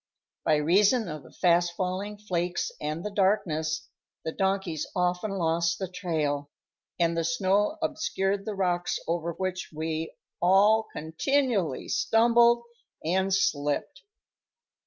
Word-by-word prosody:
By 155 - +4
reason 200 - +3
of 155 -2 -6
the - - -16
fast 175 -1 +2
falling 195 +3 -3
flakes 180 -4 -2
and 155 +4 -3
the 210 - -3
darkness, 165 -7 0 0.4
the 160 - -1
donkeys 190 -4 -1
often 180 +3 0
lost 165 -3 0
the 190 - -3
trail, 155 -6 -2 0.5
and 170 -1 +2
the 165 - 0
snow 190 - +1
obscured 195 -9 -1
the 215 - -3
rocks 175 -2 0
over 170 0 -1
which 185 +1 -3
we 160 +1 -3 0.3
all 205 +5 +5
continually 195 - 0
stumbled 235 +1 +4 0.4
and 190 +3 +1
slipped. 195 - 0
180 Hz, 120 wpm, -27 LUFS, 165-200 Hz, 0.5 s, all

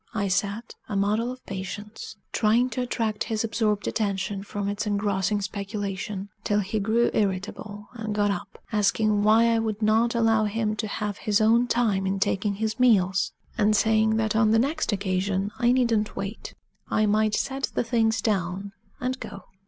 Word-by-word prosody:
I 200 -2 0
sat, 200 +4 -1 0.2
a 205 - -3
model 210 +5 +1
of 255 0 -11
patience, 205 +3 -7 0.2
trying 235 +4 +2
to 250 - -2
attract 225 -3 -1
his 220 -1 -1
absorbed 215 -2 0
attention 200 -2 -1
from 205 0 -4
its 205 +2 -2
engrossing 205 0 0
speculation 200 0 -4
till 210 -1 +1
he 205 +3 -2
grew 225 +4 +2
irritable 205 +1 -2
and 220 -3 -4
got 205 -1 +2
up, 190 - -6
asking 210 0 +2
why 215 +2 +5
I 225 - +2
would 220 -2 -2
not 225 +3 +3
allow 225 -2 +3
him 215 0 -1
to 215 - -2
have 205 0 -4
his 205 -1 +1
own 230 +3 +4
time 210 -6 +1
in 195 +1 -1
taking 200 +1 0
his 220 +2 -2
meals? 195 -6 +3 0.3
and 215 0 +4
saying 220 0 +3
that 220 -1 0
on 220 -1 +4
the 225 - +4
next 285 +6 0
occasion 195 0 -1
I 240 -1 +4
needn't 230 -4 +1
wait 200 +3 -6 0.3
I 215 - +2
might 215 +1 +2
set 270 0 -1
the - - +1
things 225 -2 +1
down 195 -1 -1 0.3
and 255 +1 -2
go. 195 - -8
210 Hz, 175 wpm, -25 LUFS, 200-225 Hz, 0.3 s, why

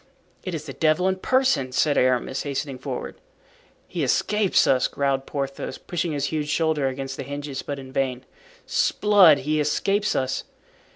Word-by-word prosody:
"It 185 -3 -4
is 155 -1 -6
the 135 - -7
devil 160 +5 +2
in 190 0 +1
person!" 255 - +1
said 145 +2 +2
Aramis, 130 +1 +1
hastening 140 -2 -4
forward. - - -6 0.7
"He - - -3
escapes 210 -2 +2
us," 130 -1 +3
growled 135 -1 -1
Porthos, 140 -1 -4
pushing 175 -1 -3
his 145 -1 -1
huge 150 -1 -2
shoulder 155 -2 +1
against 135 0 -4
the - - -4
hinges, 140 0 -5
but 145 - -5
in 130 -1 -10
vain. 130 -2 -2 0.4
"'Sblood! 190 -9 +4
he 155 +3 0
escapes 195 +8 +1
us." 130 -1 -1
145 Hz, 160 wpm, -24 LUFS, 135-165 Hz, 0.7 s, Sblood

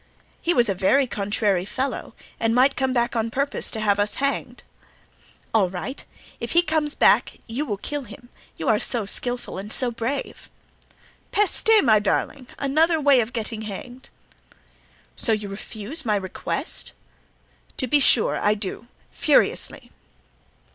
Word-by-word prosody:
"He 340 - +1
was 240 -8 +4
a 195 - +1
very 200 +9 +3
contrary 205 -4 0
fellow 260 +7 -4 0.2
and 225 0 +1
might 265 +3 +4
come 265 -1 0
back 240 -1 0
on 225 0 0
purpose 280 +4 -2
to 220 - -5
have 205 -2 +2
us 205 0 +1
hanged." 275 0 -2 0.9
"All 205 -5 +3
right; 190 +10 -6 0.4
if - - -4
he 345 +1 +5
comes 305 -3 0
back - - +3
you 260 +7 -3
will 205 -4 -2
kill 290 +8 -3
him, 240 +1 -13 0.3
you 160 - -4
are 215 -2 +4
so 230 -4 -1
skillful 245 +1 -2
and 205 +2 -7
so 250 +1 0
brave." 235 +4 -4 0.8
"Peste! 415 +1 +1
my 220 -5 +5
darling! 250 +5 -1
another 315 +4 +2
way 285 -3 +5
of 225 +1 -4
getting 225 -1 -4
hanged." 245 +5 -8 1.1
"So 225 - +1
you 210 -2 -3
refuse 215 +7 -4
my 215 -4 +1
request?" 190 -2 -4 0.8
"To 260 - +1
be 290 +4 +3
sure 245 -4 +4
I 210 +1 +2
do—furiously!" 225 - -1
235 Hz, 150 wpm, -23 LUFS, 210-275 Hz, 1.1 s, he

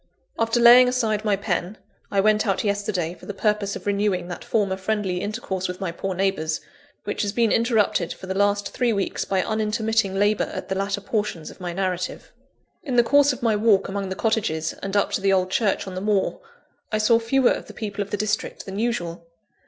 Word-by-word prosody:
After 230 +1 +2
laying 245 +1 +8
aside 220 -4 0
my 210 -2 +2
pen, 195 0 -2 0.3
I 195 - +2
went 215 +1 +3
out 195 -1 +1
yesterday 200 -5 -1
for - - -15
the 205 - -5
purpose 210 -1 0
of - - -8
renewing 200 -3 0
that 175 - -6
former 200 -4 0
friendly 190 -2 -2
intercourse 200 -3 -3
with 180 0 -6
my 190 -4 -2
poor 190 +2 -4
neighbours, 175 -5 0 0.4
which - - -3
has 205 -2 0
been 230 -2 +2
interrupted 220 -7 +2
for - - -8
the 190 - -3
last 205 +1 +1
three 245 -2 +1
weeks 200 -3 -1
by 190 -1 0
unintermitting 220 -2 0
labour 205 +2 +2
at - - -6
the - - 0
latter 195 +1 -1
portions 205 -6 -3
of - - -16
my 175 -1 -3
narrative. 180 0 -3 0.5
In 275 -8 -3
the 240 - +6
course 285 +3 +4
of 255 - -7
my 225 -2 +3
walk 210 -2 +3
among 195 -1 -3
the 190 - -3
cottages 185 -8 0
and 195 +1 -2
up 200 - +1
to - - -1
the 195 0 +3
old 185 -1 +2
church 205 -1 +1
on 190 - -7
the 185 - -4
moor, 205 -1 0 0.5
I 215 - +1
saw 220 +2 +4
fewer 245 +3 +3
of - - -3
the - - -10
people 205 -2 -4
of 200 - -4
the 205 - -2
district 210 0 -2
than 195 +1 -5
usual. 175 -8 -2
205 Hz, 215 wpm, -23 LUFS, 190-220 Hz, 0.5 s, laying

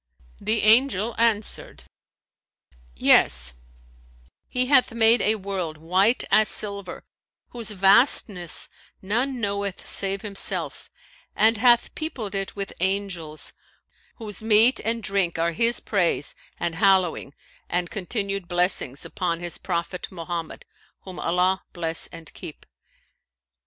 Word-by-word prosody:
The 215 +2 -1
Angel 225 -1 +3
answered, 225 -2 -1 1.1
'Yes, - - +4 0.9
He 250 0 -1
hath 255 -2 +4
made 230 +1 +4
a 215 - +3
world 190 -6 -5
white 185 +9 +1
as 215 0 +4
silver, 200 -3 +2 0.5
whose 235 -2 -7
vastness 195 - +2 0.4
none 245 +7 -1
knoweth 200 -2 -3
save 195 0 -2
Himself, 200 -2 -2 0.5
and 220 +1 +3
hath 240 +1 +3
peopled 240 -10 -5
it 195 -1 -4
with 200 -1 -5
Angels, 185 -5 -2 0.6
whose 215 -4 -8
meat 220 +3 +5
and 230 0 -2
drink 195 -4 0
are 165 +1 0
His 230 +8 +1
praise 175 -8 0 0.3
and 170 - -2
hallowing 180 -5 +1 0.3
and 175 0 -2
continual 200 -1 -2
blessings 175 -6 0
upon 170 -2 -3
His 175 -1 -5
Prophet 175 0 -4
Mohammed 170 -2 -6 0.4
(whom 185 -2 -10
Allah 180 +2 +1
bless 165 -2 -1
and 165 -2 -12
keep!). 155 - -10
195 Hz, 115 wpm, -24 LUFS, 175-220 Hz, 1.1 s, meat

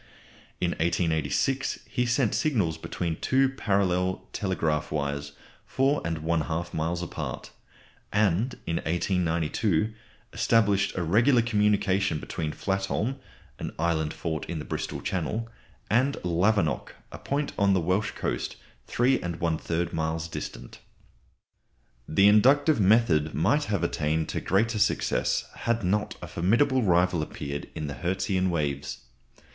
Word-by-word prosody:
In 85 - +1
1886 85 - 0
he 125 -1 -1
sent 125 -2 +2
signals 100 - 0
between 85 -1 -3
two 135 0 +2
parallel 95 -7 0
telegraph 80 -6 -1
wires 70 -1 -2 0.3
4 135 +2 +1
1/2 80 +1 -2
miles 85 +2 -1
apart. 85 - -5 0.6
And 105 +4 +2
in 85 0 -1
1892 85 +3 0 0.4
established 100 -4 +2
a 90 - 0
regular 115 - +4
communication 105 -5 +2
between 75 0 -4
Flatholm, 100 - -2 0.4
an - - -5
island 80 -2 0
fort 80 -2 -3
in 85 - -4
the 75 - -5
Bristol - - -4
Channel, 105 +6 -2 0.4
and 130 +5 +2
Lavernock, 90 0 +1 0.2
a - - -8
point 145 +1 -2
on 100 -1 +4
the - - +3
Welsh 95 +5 0
coast - - -3 0.3
3 130 +2 +2
1/3 85 0 -2
miles 80 0 -1
distant. - - -7 1.3
The 95 +6 +4
inductive 135 +7 +5
method 95 -7 +3
might 115 - +2
have 100 - -1
attained 80 -1 0
to - - -2
greater 110 +4 +1
successes 105 - +1
had 115 -1 -1
not 105 +4 0
a - - -5
formidable 125 +10 +2
rival 90 -4 +3
appeared 70 -1 -5
in 80 - -3
the 70 - -4
Hertzian 95 +2 0
waves. 75 -5 -2
90 Hz, 125 wpm, -27 LUFS, 80-110 Hz, 1.3 s, inductive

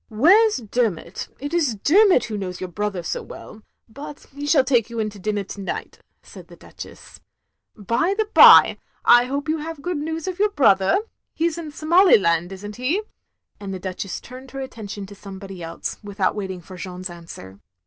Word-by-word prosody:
"Where 360 - +5
's 425 - -3
Dermot; 215 -7 -2
it 290 +4 -6
is 300 -10 +1
Dermot 360 - +4
who 220 - -5
knows 185 -3 -5
your 185 -1 -6
brother 200 -1 -3
so - - -3
well; 220 - -12 0.3
but 280 +5 -10
he 285 +1 -6
shall 295 -3 +4
take 245 -4 +1
you 235 - -7
in 215 -1 -1
to 205 - -13
dinner 210 +1 -2
to 200 +1 -9
night, 195 - -6
" - - -49
said - - -13
the - - -14
Duchess. - - -12 0.3
" - - -54 0.2
By 235 - 0
the 435 - +1
bye, - - +8 0.3
I 240 0 +7
hope 280 +4 -3
you 315 +1 0
have 310 -1 -7
good 350 -4 -2
news 320 +2 -4
of 370 0 -4
your 420 +1 +3
brother; 200 - +3 0.4
he 330 - +1
's 340 0 -4
in 320 -2 -6
Somaliland, 290 - +3
is 195 +1 -9
n't 205 0 -8
he?" 300 - -1 0.6
and 195 -2 -6
the - - -6
Duchess 185 +1 -5
turned 255 +1 -12
her 270 - -7
attention 210 -6 -7
to 200 - -12
somebody 195 -2 -10
else, 165 0 -6
without 200 -2 -1
waiting 190 -3 -5
for 185 +2 -12
Jeanne's 180 0 -7
answer. 130 - -11
220 Hz, 200 wpm, -22 LUFS, 195-300 Hz, 0.6 s, bye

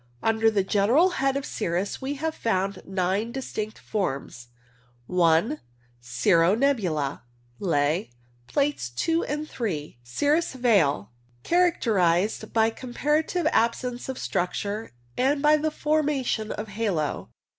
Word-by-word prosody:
Under 225 0 +3
the 205 -3 +1
general 220 - +3
head 270 0 +2
of 280 - -4
cirrus 190 -5 -2
we 270 +2 -3
have 315 +3 -2
found 195 -5 -1
nine 190 +4 -1
distinct 220 -4 -5
forms 135 - -4 0.4
— 120 -1 -35 0.2
I. 220 - +1 0.4
Cirro 165 - +3
nebula 185 - 0 0.4
(Ley) 165 0 +1 0.4
(Plates 285 - 0
2 325 - 0
and 300 +2 -3
3). 155 - -4
Cirrus 290 - +1
veil. 190 - +2 0.3
Characterized 215 - +2
by 225 0 +3
comparative 295 +8 -1
absence 240 +2 0
of 260 - -4
struc 180 +1 -1
ture 210 - -4 0.2
and 275 +3 +2
by 300 +1 +5
the 310 +1 0
formation 295 -8 0
of 210 +1 -5
halo. 195 -8 -2
220 Hz, 125 wpm, -26 LUFS, 175-275 Hz, 0.4 s, by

